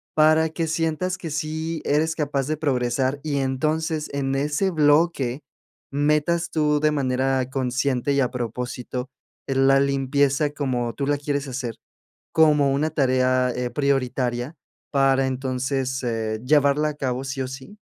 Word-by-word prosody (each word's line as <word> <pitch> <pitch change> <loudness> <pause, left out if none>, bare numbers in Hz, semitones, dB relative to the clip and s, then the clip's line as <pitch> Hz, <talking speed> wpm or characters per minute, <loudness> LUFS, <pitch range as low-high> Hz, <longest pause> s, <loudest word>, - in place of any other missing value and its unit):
para 155 +1 +4
que 165 +1 -2
sientas 165 +3 -1
que 165 - -6
sí 155 +1 -3
eres 160 +2 +1
capaz 140 -3 -1
de 155 0 -1
progresar 130 -1 0
y 150 -2 -1
entonces, 155 +4 -1
en 135 -1 -1
ese 150 +7 0
bloque, 145 -4 +2 0.5
metas 150 +4 +1
tú, 150 -2 +2
de 155 +1 +2
manera 130 -2 0
consciente 130 +1 0
y 140 - +2
a 125 -2 +2
propósito, 125 +1 -4 0.4
eh, 135 - -1
la 135 +1 +5
limpieza 140 +1 +1
como 125 -5 -2
tú 140 +2 -3
la 145 0 +2
quieres 145 0 -2
hacer, 125 -3 -4 0.6
como 150 -3 +4
una 150 +3 0
tarea, 130 -3 +2
eh, 125 0 -2
prioritaria, 130 -1 -1 0.4
para 135 -1 +3
entonces, 130 0 -2
eh, 110 -2 -2
llevarla 145 +1 +3
a - - -4
cabo, 130 -2 -2
¿sí 135 0 -4
o 130 - -2
sí? 135 +10 -10
140 Hz, 145 wpm, -23 LUFS, 130-150 Hz, 0.6 s, la